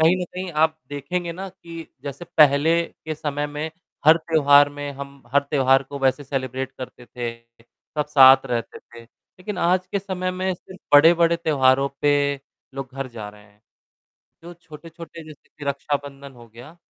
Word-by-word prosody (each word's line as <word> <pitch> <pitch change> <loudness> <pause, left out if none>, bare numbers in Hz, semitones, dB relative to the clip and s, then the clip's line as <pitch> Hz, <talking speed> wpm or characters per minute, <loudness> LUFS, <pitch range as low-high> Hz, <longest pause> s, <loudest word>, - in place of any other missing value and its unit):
कहीं 165 +3 +5
न - - -1
कहीं 185 0 -5
आप 160 0 +2
देखेंगे 170 +5 -4
ना, 190 +3 -7
कि 170 -3 -11 0.2
जैसे 140 +4 -7
पहले 155 +3 +5
के 160 -1 -8
समय 145 -1 -3
में 150 +2 -5 0.4
हर 160 +1 +8
त्योहार 145 -3 +4
में 145 0 -4
हम 140 0 -10
हर 145 - +5
त्योहार 135 -1 +3
को 140 +1 -8
वैसे 135 +2 +1
सेलिब्रेट 130 -1 -4
करते 125 -1 -9
थे, 120 -2 -5 0.6
सब 150 - 0
साथ 135 -2 +7
रहते 120 -2 -4
थे, 115 0 -15
लेकिन 185 - -10
आज 180 +1 +1
के 200 - +1
समय 185 -2 -3
में 185 +1 -2
सिर्फ़ 185 +1 -15
बड़े-बड़े 170 +3 +6
त्योहारों 140 -4 +2
पे 145 0 +3 0.6
लोग 135 -1 -6
घर 135 -1 -4
जा 110 -4 -8
रहे 105 0 -15
हैं। 105 0 -26 0.8
जो 175 +1 -10
छोटे-छोटे 165 0 -12
जैसे 155 -2 -15
कि 145 - -8
रक्षाबंधन 140 0 -4
हो 120 -2 -15
गया, 120 +9 -14
145 Hz, 170 wpm, -22 LUFS, 135-170 Hz, 0.8 s, हर